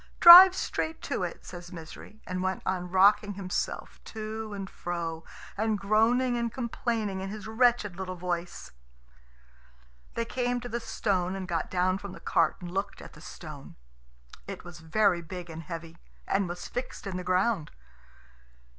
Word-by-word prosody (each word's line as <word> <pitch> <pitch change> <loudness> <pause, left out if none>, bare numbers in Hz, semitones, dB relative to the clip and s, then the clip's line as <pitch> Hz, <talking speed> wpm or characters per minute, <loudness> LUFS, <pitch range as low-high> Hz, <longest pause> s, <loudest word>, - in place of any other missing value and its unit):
"Drive 360 +2 +12
straight 320 -3 -3
to - - -2
it," - - -5
says 175 -1 -9
Misery, 175 +5 -11
and 185 0 -3
went 190 0 -2
on 180 -1 -2
rocking 200 +2 +4
himself 185 -2 -4
to 220 0 -6
and 195 -1 -5
fro, 170 -3 -5 0.3
and 220 0 0
groaning 225 +5 +2
and 235 -1 -1
complaining 225 -5 -2
in 190 - -4
his 215 +1 -7
wretched 220 -4 +2
little 185 -1 -5
voice. 175 -1 -4 1.4
They 230 - -1
came 245 +1 -1
to 245 - -7
the 235 +1 -2
stone, 190 -5 -1
and 190 -1 -5
got 165 -3 -2
down 185 +1 +1
from 200 -2 -8
the - - -10
cart - - +2
and 175 -1 -7
looked 195 +2 -3
at - - -11
the - - -14
stone. - - -10 0.7
It - - -7
was 175 -1 -11
very 175 +2 +2
big 175 +1 -8
and 160 +1 -7
heavy, 165 +1 -8 0.3
and 195 -2 +1
was 175 0 -6
fixed 250 -1 -6
in 195 -2 -4
the 180 - -4
ground. 185 -2 +1
195 Hz, 165 wpm, -28 LUFS, 180-220 Hz, 1.4 s, Drive